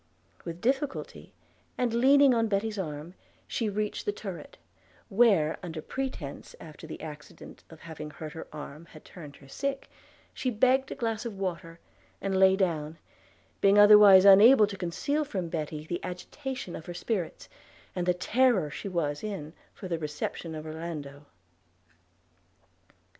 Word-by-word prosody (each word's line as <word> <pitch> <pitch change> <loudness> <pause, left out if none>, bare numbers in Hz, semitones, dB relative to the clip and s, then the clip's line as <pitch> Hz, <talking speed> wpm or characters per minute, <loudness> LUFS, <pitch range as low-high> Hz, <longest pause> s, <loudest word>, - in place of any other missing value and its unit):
With 170 0 -7
difficulty, 270 +3 -2 0.5
and 245 -2 0
leaning 270 +3 +5
on 230 -1 +2
Betty's 210 +1 -1
arm, 155 -1 -5 0.3
she 225 -3 -2
reached 210 - -3
her - - +2
turret; 440 +3 -8 0.5
where, 195 -8 +3
under 165 -3 -6
pretence 180 - -6
that 155 -2 -12
the 160 - -8
accident 150 -1 -11
of 160 -1 -14
having 155 -2 -8
hurt 155 0 -9
her 160 - -8
arm 150 +1 -9
had 155 -2 -16
turned 150 -6 -11
her 135 - -17
sick, 275 - -4 0.4
she 255 - -2
begged 260 +3 +2
a - - -4
glass 225 -2 -2
of 225 -5 -6
water, 170 -3 -5 0.4
and 195 -1 -2
lay 190 0 +6
down, 165 -5 -1 0.6
being 200 +1 +5
otherwise 205 -2 +9
unable 210 +4 +8
to 200 -1 -7
conceal 195 - -2
from 190 - -4
Betty 155 -2 -4
the 175 +2 -4
agitation 255 +3 -6
of 160 - -9
her 175 - -6
spirits, 185 -3 -3 0.5
and 180 -1 -2
the 180 - +4
terror 210 - +2
she 200 - -6
was 150 -5 -2
in 190 -8 -5 0.2
for 190 - -9
the 170 -2 -2
reception 155 +2 -5
of 155 0 -7
Orlando. 155 -3 -7
185 Hz, 150 wpm, -28 LUFS, 160-225 Hz, 0.6 s, otherwise